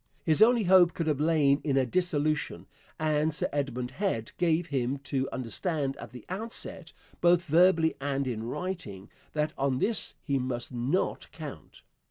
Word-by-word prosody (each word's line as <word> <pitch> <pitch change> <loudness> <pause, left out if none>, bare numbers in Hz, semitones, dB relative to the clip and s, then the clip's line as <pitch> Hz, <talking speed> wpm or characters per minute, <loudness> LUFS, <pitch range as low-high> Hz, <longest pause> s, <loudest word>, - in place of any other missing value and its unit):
His 160 +4 +3
only 235 0 +6
hope 180 -2 +5
could 165 - -2
have 150 -3 0
lain 150 -3 +3
in 140 -3 +1
a 130 - +3
dissolution, 155 -3 0 0.3
and 155 0 +1
Sir - - +2
Edmund 130 -3 -2
Head 130 - -2
gave 170 -1 +2
him 135 -3 -1
to 135 -2 -2
understand 135 - -2
at - - -9
the 125 -3 -12
outset, 220 +5 -3 0.3
both 175 0 +4
verbally 165 0 +4
and 140 0 -1
in 120 -4 -3
writing, 115 - -5 0.2
that 150 0 -1
on 135 -1 +1
this 210 - +1
he 140 -2 0
must 125 -1 -3
not 125 +9 -1
count. - - -10
150 Hz, 160 wpm, -28 LUFS, 135-175 Hz, 0.3 s, only